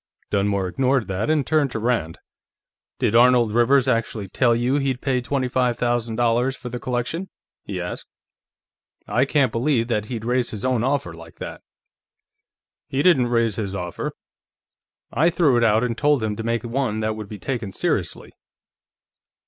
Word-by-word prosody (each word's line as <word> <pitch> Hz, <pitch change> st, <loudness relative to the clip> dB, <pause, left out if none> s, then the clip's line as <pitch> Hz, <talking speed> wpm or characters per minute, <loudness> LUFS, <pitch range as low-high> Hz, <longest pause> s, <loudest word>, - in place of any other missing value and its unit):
Dunmore 100 Hz, -1 st, +1 dB
ignored 130 Hz, +2 st, +1 dB
that 95 Hz, +8 st, -1 dB
and 155 Hz, -3 st, +2 dB
turned 155 Hz, -3 st, +2 dB
to -, -, -2 dB
Rand. 110 Hz, -9 st, -1 dB, 0.8 s
"Did -, -, 0 dB
Arnold 120 Hz, -2 st, +5 dB
Rivers 125 Hz, +4 st, +3 dB
actually 115 Hz, -4 st, -1 dB
tell 120 Hz, +4 st, +2 dB
you 125 Hz, +4 st, +1 dB
he'd 135 Hz, -3 st, -1 dB
pay 130 Hz, -2 st, 0 dB
twenty 130 Hz, +1 st, -1 dB
five 125 Hz, -1 st, 0 dB
thousand 120 Hz, -2 st, -1 dB
dollars 120 Hz, +3 st, +1 dB
for 125 Hz, -, -8 dB
the 120 Hz, +1 st, -5 dB
collection?" 125 Hz, +10 st, -3 dB, 0.4 s
he 95 Hz, -3 st, -4 dB
asked. 90 Hz, 0 st, -6 dB, 1.0 s
"I 125 Hz, +3 st, +2 dB
can't 140 Hz, -1 st, +2 dB
believe 120 Hz, -1 st, 0 dB
that 105 Hz, -3 st, 0 dB
he'd 115 Hz, -1 st, -5 dB
raise 125 Hz, 0 st, +1 dB
his 110 Hz, +2 st, -4 dB
own 125 Hz, -3 st, +1 dB
offer 130 Hz, -10 st, -1 dB
like 85 Hz, -1 st, -13 dB
that." -, -, -7 dB, 1.3 s
"He 135 Hz, +2 st, -1 dB
didn't 150 Hz, -9 st, +4 dB
raise 115 Hz, -4 st, +1 dB
his 100 Hz, -3 st, -3 dB
offer; 90 Hz, -2 st, -4 dB, 1.0 s
I 155 Hz, +7 st, +4 dB
threw 165 Hz, -6 st, +3 dB
it 120 Hz, -, +3 dB
out 110 Hz, +1 st, +3 dB
and 120 Hz, -2 st, -1 dB
told 145 Hz, -2 st, +2 dB
him 105 Hz, -1 st, -1 dB
to 115 Hz, -, -5 dB
make 115 Hz, +1 st, -1 dB
one 120 Hz, -3 st, -1 dB
that 110 Hz, 0 st, 0 dB
could 105 Hz, -2 st, -8 dB
be 105 Hz, -, -7 dB
taken 115 Hz, -2 st, -4 dB
seriously." -, -, -2 dB
120 Hz, 170 wpm, -22 LUFS, 110-130 Hz, 1.3 s, Arnold